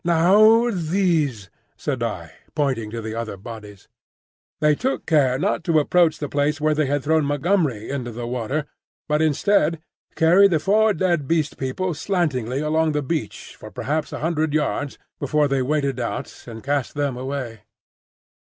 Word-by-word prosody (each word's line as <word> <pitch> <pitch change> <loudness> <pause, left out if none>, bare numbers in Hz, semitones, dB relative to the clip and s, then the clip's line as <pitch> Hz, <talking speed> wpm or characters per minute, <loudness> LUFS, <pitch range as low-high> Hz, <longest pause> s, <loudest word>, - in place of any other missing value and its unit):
"Now 210 +8 +5
these," 160 - 0 0.3
said 135 -5 -3
I, 90 -8 -4 0.2
pointing 130 -8 -1
to 115 +1 -6
the 110 0 -5
other 115 -3 -4
bodies. 105 -1 -11 0.7
They 150 -1 +4
took 260 - -2
care 135 -6 +3
not 175 +2 -1
to 165 -2 +2
approach 160 +1 +3
the 145 - -4
place 145 +2 0
where 155 0 +2
they 150 -1 0
had 145 0 -1
thrown 160 +1 +2
Montgomery 145 - 0
into 125 -4 -4
the 120 +1 -6
water, 125 +5 -2 0.4
but 150 +1 +1
instead, 160 +1 +2 0.4
carried 180 +5 +5
the 165 -4 +2
four 210 +5 +3
dead 175 -7 0
Beast 160 -2 0
People 165 +8 -2
slantingly 145 - -1
along 155 +1 +1
the 150 -1 -1
beach 155 +4 -4
for - - -11
perhaps 150 +2 -3
a - - -6
hundred 160 -2 0
yards 145 -2 -1 0.2
before 150 +1 +1
they 135 -1 0
waded 140 -1 -1
out 120 - -5
and 115 -2 -9
cast 140 -1 -1
them 145 -3 -1
away. 130 -3 -5
150 Hz, 160 wpm, -22 LUFS, 130-165 Hz, 0.7 s, Now